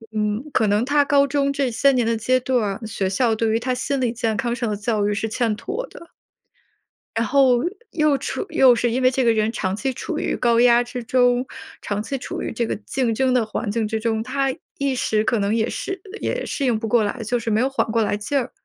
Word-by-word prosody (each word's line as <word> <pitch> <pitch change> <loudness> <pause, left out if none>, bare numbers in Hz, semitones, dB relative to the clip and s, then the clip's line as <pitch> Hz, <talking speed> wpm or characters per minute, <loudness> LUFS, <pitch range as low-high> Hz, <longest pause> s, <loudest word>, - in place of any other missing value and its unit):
嗯， 210 +3 -1
可 220 - +2
能 205 +2 +2
他 285 +1 +3
高 280 0 +4
中 280 0 0
这 275 -3 0
些 275 +5 +3
年 245 -3 +1
的 230 0 +1
阶 255 +3 +2
段， 235 -4 -1
学 200 -3 -2
校 225 +4 +1
对 225 0 0
于 225 - +1
他 255 +2 -1
心 275 +2 -2
理 240 -2 +1
健 225 -2 -1
康 240 -2 -1
上 240 -3 -2
的 210 - -1
教 210 0 0
育 210 - 0
是 205 +2 -2
欠 225 -2 0
妥 435 - -4
的。 335 - -13 1.1
然 225 - +1
后 260 -1 +4 0.3
又 305 -3 +2
处 - - -4
又 255 -2 +6
是 240 +1 +1
因 250 +3 0
为 255 0 +4
这 260 0 0
个 230 - +4
人 220 0 +1
长 190 -4 -2
期 265 +5 -2
处 - - -5
于 - - -1
高 235 -2 +2
压 240 0 +5
之 245 0 -6
中， 245 +1 +2 0.4
长 205 0 -3
期 270 +5 -4
处 - - -6
于 - - -3
这 235 +1 -1
个 - - -2
竞 230 +3 -2
争 260 +3 +1
的 245 -3 +2
环 215 0 -4
境 220 0 -1
之 220 0 -2
中， 220 -1 -1
他 270 +1 -1 0.3
一 275 -1 0
时 215 -3 +1
可 235 +1 +1
能 200 +1 0
也 225 0 0
适 385 -1 -5 0.2
也 - - -2
适 280 - -2
应 240 -4 +2
不 225 - -3
过 230 0 +3
来， 205 +2 -3
就 245 +3 0
是 230 - -4
没 215 +2 +2
有 265 - +1
缓 275 - 0
过 230 0 +2
来 205 0 0
劲 245 +7 -2
儿。 255 -1 -4
240 Hz, 265 characters per minute, -22 LUFS, 220-260 Hz, 1.1 s, 又